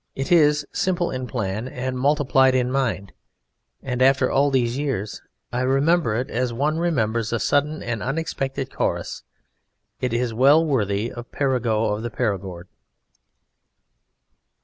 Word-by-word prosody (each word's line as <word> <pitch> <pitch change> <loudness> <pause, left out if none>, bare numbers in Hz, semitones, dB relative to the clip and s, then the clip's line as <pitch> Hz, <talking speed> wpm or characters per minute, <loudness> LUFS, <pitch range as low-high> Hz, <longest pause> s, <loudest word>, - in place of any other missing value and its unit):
It 135 +3 -4
is 150 -3 +4
simple 175 -2 0
in 130 0 -4
plan 110 -1 -3
and 130 0 -4
multiple 140 0 +2
in 130 -1 +4
the 125 - -3
mind; 110 -8 -1 0.7
and 125 -1 -3
after 135 +1 +4
all 140 +1 +3
these 125 -3 +1
years 130 -8 -3 0.3
I 125 - 0
remember 135 0 +2
it 125 +4 -3
as 125 0 -1
one 150 +7 0
remembers 115 -9 0
a 115 - +1
sudden 145 +6 0
and 115 -3 -3
unexpected 135 -2 -3
chorus. - - -2 0.8
It 125 - -1
is 120 0 -1
well 140 +7 +5
worthy 110 -6 0
of 120 0 -9
Perigeux 115 -6 0
of 105 - -4
the 120 - -3
Perigord. 95 -7 -3
130 Hz, 145 wpm, -23 LUFS, 115-140 Hz, 0.8 s, well